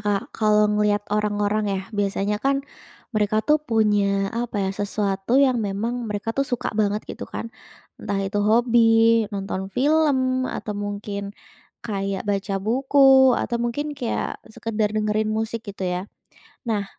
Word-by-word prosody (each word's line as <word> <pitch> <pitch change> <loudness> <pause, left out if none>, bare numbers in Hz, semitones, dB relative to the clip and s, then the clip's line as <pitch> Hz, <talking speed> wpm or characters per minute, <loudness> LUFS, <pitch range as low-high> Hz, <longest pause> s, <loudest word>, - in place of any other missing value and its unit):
Kak, 205 -1 -2
kalau 210 -1 +3
ngelihat 210 0 +1
orang-orang 210 0 0
ya, 195 -1 -1
biasanya 205 0 -1
kan 275 +2 0 0.5
mereka 215 0 +1
tuh 300 0 +3
punya 205 -6 +1
apa 230 -4 -2
ya, - - -1
sesuatu 200 +2 -1
yang 260 -3 +4
memang 225 +4 -3
mereka 210 +2 -3
tuh 275 +3 0
suka 245 - -2
banget 210 0 0
gitu - - -8
kan. 230 - -6 0.5
Entah 200 - -2
itu 195 +1 -1
hobi, 225 0 +4
nonton 195 -2 -4
film, 260 0 +2
atau 210 - -4
mungkin 205 0 -5 0.5
kayak 195 -3 -3
baca 200 0 -1
buku, 265 +3 +5
atau 240 - -1
mungkin 285 +6 -2
kayak 255 -5 -3
sekadar 220 -1 -2
dengerin 215 0 0
musik 220 +1 -2
gitu 195 -1 -5
ya. 180 0 -1 0.7
Nah, 205 -2 0
215 Hz, 140 wpm, -23 LUFS, 205-235 Hz, 0.7 s, buku